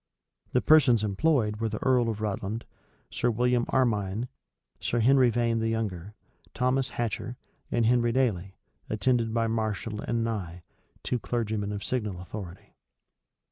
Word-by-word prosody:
The 125 - +3
persons 130 -8 +5
employed 105 0 +1
were 115 +1 -1
the 110 - -4
earl 125 -3 +3
of 110 -1 -4
Rutland, 105 +1 -3 0.5
Sir 120 - 0
William 120 +1 +1
Armyne, 110 -2 0 0.5
Sir 120 - -1
Henry 130 +2 +5
Vane 115 0 +1
the 115 0 0
younger, 105 -3 -3 0.4
Thomas 130 +1 +1
Hatcher, 120 +1 -3 0.3
and 115 - +2
Henry 120 0 +3
Dailey, 100 -7 0 0.3
attended 115 +2 +1
by 115 0 +1
Marshall 110 -1 -2
and 115 -1 -1
Nye, 90 -7 -4 0.4
two 125 - -1
clergymen 110 -4 -2
of 100 0 -4
signal 105 -8 -2
authority. 90 0 -9
115 Hz, 140 wpm, -28 LUFS, 105-120 Hz, 0.5 s, persons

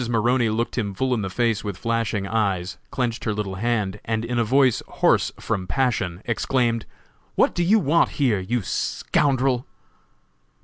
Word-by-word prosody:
[Illustration: 120 -1 -3
"_Mrs. - - +3
Maroney 120 -1 +3
looked 115 +3 -2
him 100 -3 -2
full 130 +4 0
in 115 - 0
the 95 - -3
face 115 +1 0
with 100 -3 -4
flashing 115 -2 -1
eyes, 100 -4 -1
clenched 120 -3 -2
her 110 -2 0
little 100 -2 -3
hand, 105 -1 -1
and 110 0 -2
in 120 0 -1
a - - +3
voice 130 +1 +3
hoarse - - +2
from 100 -5 -2
passion, 110 -8 -1
exclaimed: 115 -1 0 0.5
'What - - +3
do 175 - -1
you 200 +6 +5
want 170 -3 +3
here, 125 -8 +2
you 110 +4 -2
scoundrel?' 130 +4 0
115 Hz, 175 wpm, -23 LUFS, 105-125 Hz, 0.5 s, you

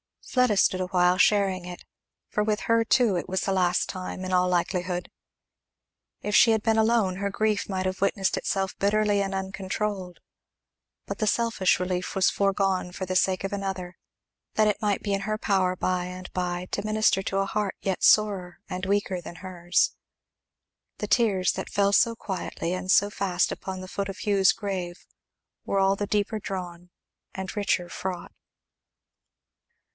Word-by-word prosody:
Fleda 250 -4 +2
stood 185 -1 +3
awhile 180 0 +2
sharing 195 -3 +3
it, 180 0 -8 0.5
for 210 - 0
with 210 0 0
her 230 0 +2
too 230 -6 +3
it 170 - -4
was 190 0 -1
the 195 - -1
last 180 -2 +2
time, 185 0 -5
in 185 - -4
all 180 0 +3
likelihood. 180 0 -1 1.1
If 210 - -3
she 230 - +7
had 220 -1 +1
been 225 -1 +2
alone, 220 -4 +2
her 200 +1 -1
grief 215 0 0
might 185 -1 -2
have 185 0 -2
witnessed 195 -1 +1
itself 195 -1 -1
bitterly 205 0 +2
and 195 0 -2
uncontrolled; 190 0 -4 0.9
but - - -5
the 215 - -1
selfish 225 -5 +2
relief 180 0 -2
was 190 0 +4
foregone, 195 -2 0
for 185 - -4
the 185 0 -3
sake 185 0 +2
of 195 - -3
another, 190 -3 -4 0.6
that 215 -1 +3
it 210 - -2
might 205 -2 0
be 205 - -1
in 195 - 0
her 215 +2 -2
power 190 -4 +1
by 180 0 -1
and 185 0 -8
by 180 0 -2
to 200 - -2
minister 215 -2 +2
to 195 +1 -1
a 195 - +1
heart 205 0 -2
yet 190 -2 -2
sorer 195 -4 +3
and 185 0 -4
weaker 195 -2 0
than 175 - -9
hers. 175 -1 0 1.1
The - - -3
tears 200 -6 +3
that - - -5
fell 200 0 +2
so 230 +2 +4
quietly 185 -4 -4
and 185 0 -5
so 200 +1 +5
fast 190 -3 0
upon 190 -1 -5
the 185 - -8
foot 200 0 -3
of 195 - -7
Hugh's 195 -2 +3
grave 185 -4 -5 0.6
were 200 - -1
all 195 0 +3
the 205 - -2
deeper 210 +1 0
drawn 180 -3 -6 0.5
and 190 +2 -5
richer 190 -4 0
fraught. 180 -2 -5
195 Hz, 170 wpm, -26 LUFS, 185-205 Hz, 1.1 s, she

